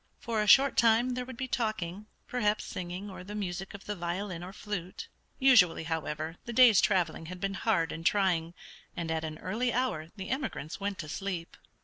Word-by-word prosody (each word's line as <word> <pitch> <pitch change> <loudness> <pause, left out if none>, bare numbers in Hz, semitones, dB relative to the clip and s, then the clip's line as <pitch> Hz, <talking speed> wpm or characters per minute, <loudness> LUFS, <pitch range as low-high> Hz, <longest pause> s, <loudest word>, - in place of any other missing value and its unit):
For 225 -2 -1
a 210 - -1
short 275 +5 +6
time 235 +2 +4
there 250 0 -3
would 260 -2 -9
be 260 - -3
talking, 215 -5 -2 0.2
perhaps 215 -4 0
singing, 180 +3 -5
or 190 -2 -8
the 205 +3 -7
music 190 -1 -4
of 200 - -11
the 210 - -3
violin 175 0 -4
or 180 - -7
flute. 195 -3 -6 0.3
Usually, 235 - +5
however, 160 0 -3
the 235 - -5
day's 235 -5 +7
traveling 180 -6 +1
had 180 +1 -7
been 195 +1 -2
hard 190 -5 +1
and 165 - -6
trying, 175 -3 +2 0.4
and 165 -2 -2
at 160 0 -1
an 155 -1 -5
early 230 +9 -1
hour 230 -11 -1
the 190 -2 -6
emigrants 260 - -3
went 200 -1 -2
to 155 - -6
sleep. 175 0 -4
195 Hz, 195 wpm, -30 LUFS, 170-220 Hz, 0.4 s, day's